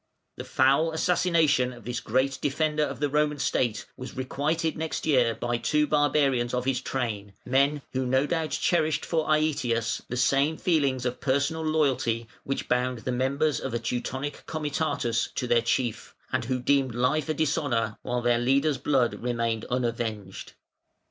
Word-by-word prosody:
The - - -5
foul 140 +5 +2
assassination 160 -6 +2
of 120 -4 -13
this 120 0 -2
great 130 +4 0
defender 150 +1 0
of 140 -4 -2
the 145 - +1
Roman 150 +1 +1
State 115 -6 0
was 130 0 -9
requited 155 +5 -1
next 160 0 -3
year 125 -7 +3
by 120 0 -1
two 150 +3 +2
barbarians 140 -5 +2
of 125 0 -2
his 130 -1 0
train, 110 -7 -3
men 140 +3 +2
who 130 -1 -1
no 130 +2 +2
doubt 160 0 -1
cherished 160 -3 +1
for 160 -2 0
Aëtius 130 -7 +1
the 125 - -3
same 140 +5 +2
feelings 140 -7 +1
of 125 0 -3
personal 140 +4 0
loyalty 135 -7 +1 0.2
which 135 - -3
bound 125 0 +1
the 125 - -3
members 135 +4 +1
of 130 -3 -4
a - - 0
Teutonic 125 +4 -4
"Comitatus" 145 -6 -1
to - - -1
their 120 -1 +3
chief, 115 -3 -2 0.2
and - - 0
who 130 +2 0
deemed 130 -1 +1
life 135 +5 +1
a - - +2
dishonour 140 -8 0
while 125 0 -2
their 120 -1 +3
leader's 135 +3 +2
blood 135 -5 +2
remained 115 -2 -1
unavenged. 115 -5 -3
130 Hz, 160 wpm, -27 LUFS, 120-150 Hz, 0.2 s, year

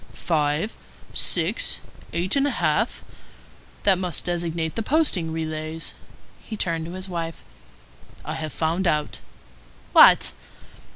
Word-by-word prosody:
"Five, 155 +4 0 0.4
six, - - +2 0.3
eight 175 +6 +1
and 280 0 +3
a - - -2
half? - - +1 0.8
That 195 -3 +4
must 180 -4 -2
designate 170 -2 -2
the 225 - -1
posting 220 - +1
relays." 160 0 -4 0.5
He 215 - -6
turned 165 -4 -1
to 170 - -7
his 185 +1 -6
wife:— 165 -2 -5 0.8
"I - - -3
have 155 -1 -4
found 170 +5 0
out." 150 -2 0 0.7
"What?" - - +8
170 Hz, 120 wpm, -24 LUFS, 160-185 Hz, 0.8 s, What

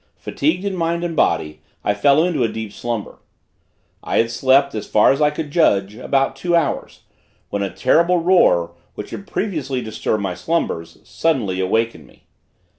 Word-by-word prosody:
Fatigued 170 +7 -1
in 200 -1 -2
mind 170 0 -1
and 170 -2 -3
body 75 - 0 0.2
I 105 - +1
fell 140 +8 +3
into 170 -6 0
a - - +2
deep 110 -2 -6
slumber. 115 -4 -5 0.8
I - - -1
had 115 0 +2
slept, 135 +3 +3
as 110 - -5
far 105 - +4
as 135 - -1
I 150 - +5
could 150 0 -5
judge, 100 - +2
about 135 +3 0
two 170 +6 0
hours, 165 -4 -1 0.5
when 100 - -2
a 100 - -1
terrible 170 - +2
roar, 165 - +3 0.2
which 105 - -8
had 200 - -8
previously 150 -10 -2
disturbed 110 -2 -2
my 95 -2 -2
slumbers, 90 - -3
suddenly 115 - -1
waked 115 +5 0
me. - - -20
135 Hz, 170 wpm, -20 LUFS, 105-165 Hz, 0.8 s, I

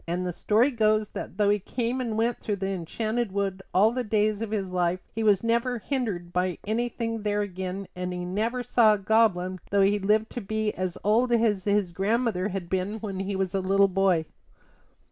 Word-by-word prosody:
And 175 +2 -2
the 180 - -2
story 225 - +2
goes 215 -3 +2
that - - -7
though 205 -1 +3
he 205 - +2
came 240 +5 -2
and 225 -3 -2
went 230 +1 0
through 210 - -2
the 195 0 -3
Enchanted 215 +5 -2
Wood 195 -1 -2
all 210 +4 +4
the 250 +1 -2
days 215 -1 +1
of 225 - -3
his 200 -4 -2
life 180 0 0
he 225 - -3
was 210 -2 +3
never 235 +2 +1
hindered 215 -9 -3
by 180 -1 0
anything 230 0 -2
there 205 0 0
again; 190 0 -5
and 180 0 -3
he 180 0 -4
never 225 +7 -1
saw 220 -3 +4
a - - -4
goblin 190 -3 +2
though 200 0 +3
he 200 +1 +3
lived 215 +3 +1
to 245 - -5
be 215 +1 -1
as 185 -2 -3
old 230 +4 +3
as 225 -5 +2
his 200 -3 +1
grandmother 205 0 0
had 190 -3 -4
been 190 +3 -1
when 200 -3 -5
he 195 +1 -2
was 190 -2 -1
a 195 - +1
little 195 +1 +3
boy. 190 -4 +2
205 Hz, 205 wpm, -26 LUFS, 185-225 Hz, -, all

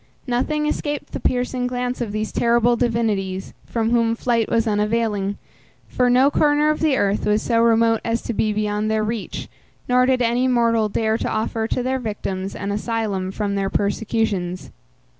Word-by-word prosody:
Nothing 300 +4 0
escaped 295 -1 -3
the - - -4
piercing 250 0 -1
glance 250 0 -3
of 225 -4 -2
these 215 +1 -3
terrible 235 0 +3
divinities, 210 -6 -1
from 225 -1 -1
whom 230 -1 +2
flight 230 -2 0
was 230 0 +2
unavailing, 210 -1 0 0.5
for 250 -1 +1
no 260 +3 +4
corner 295 +1 +3
of 305 - -2
the 305 -4 +2
earth 200 +1 0
was 210 0 +2
so 230 -1 +1
remote 230 -1 +3
as 230 0 -1
to 235 - -3
be 215 0 +1
beyond 210 0 -1
their 220 0 +1
reach, 220 0 -4 0.4
nor 250 0 +3
did 255 -1 +2
any 240 +2 +2
mortal 230 -3 +2
dare 220 +2 0
to - - -2
offer 220 +1 -1
to 250 - -1
their 260 +1 -1
victims 195 -4 -4
an 200 - -3
asylum 210 -3 -2
from 200 0 -2
their 195 -1 -1
persecutions. 200 -3 -1
230 Hz, 175 wpm, -21 LUFS, 210-245 Hz, 0.5 s, no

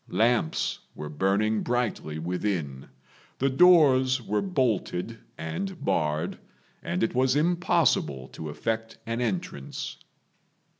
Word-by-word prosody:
Lamps 110 -4 +1 0.2
were 75 0 -6
burning 100 +7 +1
brightly 120 -10 -1
within; 85 -5 -3 0.5
the 135 +1 +1
doors 135 -5 +6
were 105 -3 -1
bolted 115 - -1 0.2
and 185 - -5
barred, 80 -3 0 0.4
and 90 - -2
it 115 - 0
was 130 +1 +2
impossible 150 - +2
to 80 - -7
effect 115 +8 -3
an 115 +1 -2
entrance. 90 - -4
110 Hz, 105 wpm, -27 LUFS, 80-130 Hz, 0.5 s, doors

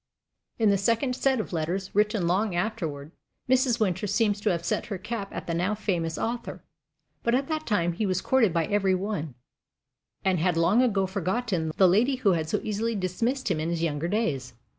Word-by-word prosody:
In 220 -3 +4
the 200 - +2
second 230 +5 +1
set 265 -1 +1
of 215 - -4
letters, 175 +4 -2
written 210 -2 +2
long 190 +3 +1
afterward, 160 -7 -3 0.4
Mrs. 255 -2 +3
Winter 210 -1 0
seems 205 0 +1
to 210 - +1
have 170 -2 -1
"set - - -1
her 200 - -3
cap" 200 +1 -5
at - - -6
the 170 - -2
now 180 +5 0
famous 170 -6 -2
author; 235 +1 -4 0.6
but 235 +1 +2
at 270 +2 0
that 310 0 -2
time 175 -6 +1
he 205 +5 -1
was 185 -1 +1
courted 240 -5 +3
by 165 -1 +1
every 195 -1 +2
one, 180 - -3 0.9
and 185 -2 +2
had 175 0 +1
long 175 +8 +4
ago 200 -6 +2
forgotten 190 -2 -1
the 190 - +6
lady 225 +9 +3
who 235 -6 +2
had 160 -3 -1
so - - +1
easily 220 +2 -1
dismissed 220 +6 -1
him 160 - 0
in 160 +2 -1
his 170 -1 -1
younger 155 0 -1
days. 140 - -1
195 Hz, 200 wpm, -27 LUFS, 170-225 Hz, 0.9 s, the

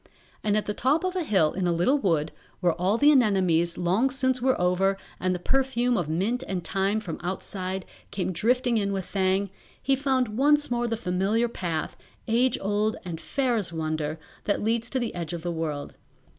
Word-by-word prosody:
And 210 -1 +2
at 210 - 0
the 210 - -2
top 275 - +1
of 370 0 -1
a 365 - 0
hill 190 - +2
in 185 -1 -1
a - - +2
little 175 +13 +2
wood, 160 - +1 0.3
where 175 -3 +2
all 185 +6 +1
the 290 +4 +6
anemones 185 - +3
long 185 +9 +2
since 260 -1 +1
were 260 +1 +2
over 185 +2 +2 0.2
and 185 0 0
the - - -1
perfume 250 +4 +1
of 175 -7 -1
mint 200 +10 0
and 185 -3 -3
thyme 195 +2 0
from 180 -7 -6
outside 185 +1 -4 0.2
came 190 -2 -2
drifting 240 - +1
in 200 -1 -1
with 190 -2 -3
Thang, 190 0 0 0.3
he 275 - +2
found 260 -5 0
once 295 0 +3
more 240 0 0
the 230 -1 -1
familiar 200 +4 +1
path, 170 -8 -3 0.3
age 240 +2 +2
old 210 +2 0
and 165 -2 -5
fair 255 - 0
as 205 -6 +1
wonder, 155 -1 -3 0.3
that 205 - 0
leads 230 +2 0
to 265 - -2
the 235 -2 -3
Edge 170 -2 -4
of 170 -1 -5
the 175 - -2
World. 155 -3 -4
200 Hz, 200 wpm, -26 LUFS, 175-245 Hz, 0.3 s, the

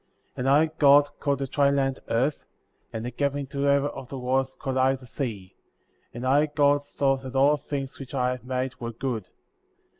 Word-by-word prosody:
10. 125 - -2
And - - +4
I, 145 +3 +5
God, 145 0 +6
called 140 -1 0
the 135 - -2
dry 140 +1 +2
land 135 -1 0
Earth; 130 +6 0 0.5
and 115 0 -5
the 125 - -4
gathering 140 +2 -1
together 140 +1 +1
of 135 -3 -9
the 135 - -6
waters 130 +1 0
called 130 -1 -3
I 130 +1 +3
the 130 -1 -13
Sea; 110 -7 -5 0.6
and 120 +2 -6
I, 145 +4 +4
God, 145 -1 +3
saw 140 -1 0
that 130 0 -9
all 140 +3 +5
things 140 -2 -5
which 135 0 -8
I 125 -1 +1
had 125 -2 -6
made 130 0 -2
were 115 0 -4
good. 115 -4 -4
135 Hz, 200 wpm, -26 LUFS, 125-140 Hz, 0.6 s, God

